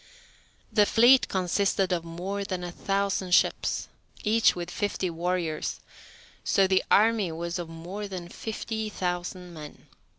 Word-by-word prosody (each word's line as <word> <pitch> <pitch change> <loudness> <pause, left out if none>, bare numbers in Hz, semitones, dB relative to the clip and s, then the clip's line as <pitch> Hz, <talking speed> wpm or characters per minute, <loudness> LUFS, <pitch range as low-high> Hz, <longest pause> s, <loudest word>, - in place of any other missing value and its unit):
The 210 -2 +5
fleet 250 +3 +6
consisted 190 +1 +1
of 175 -2 0
more 180 +4 -4
than 185 -2 -4
a 175 - -4
thousand 195 -1 0
ships, - - +1 0.4
each 225 +1 +4
with 175 0 -5
fifty 195 -3 -2
warriors, 170 -2 -2 0.6
so 195 - +3
the 190 0 +2
army 215 -4 +4
was 170 +2 -4
of 170 -2 -5
more 180 +6 -6
than 185 -3 -6
fifty 220 +2 -4
thousand 180 -1 -4
men. 150 -2 -10
185 Hz, 135 wpm, -27 LUFS, 175-205 Hz, 0.6 s, fleet